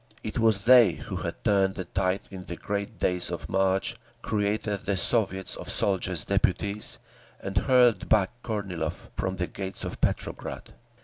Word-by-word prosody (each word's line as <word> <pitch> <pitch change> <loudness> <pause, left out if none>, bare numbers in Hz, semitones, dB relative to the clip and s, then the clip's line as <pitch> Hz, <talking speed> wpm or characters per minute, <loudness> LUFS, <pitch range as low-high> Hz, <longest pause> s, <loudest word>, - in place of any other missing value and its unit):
It 110 - -3
was 110 -3 +3
they 120 -7 +7
who - - -6
had - - -5
turned 95 -2 +3
the 95 - -3
tide 95 +2 0
in 95 -1 -8
the 85 - -5
great 100 +4 -4
days 90 -1 0
of - - -5
March, 95 0 +1 0.3
created 105 -1 0
the 100 -1 +1
Soviets 95 -2 +1
of - - -8
Soldiers' 90 -4 0
Deputies, 100 +1 0 0.4
and 95 - -6
hurled 125 +3 +4
back 100 -3 +4
Kornilov 95 -8 -4
from 95 0 -2
the 90 -1 -1
gates 95 +1 -5
of - - -6
Petrograd. - - -2
100 Hz, 160 wpm, -27 LUFS, 95-105 Hz, 0.4 s, they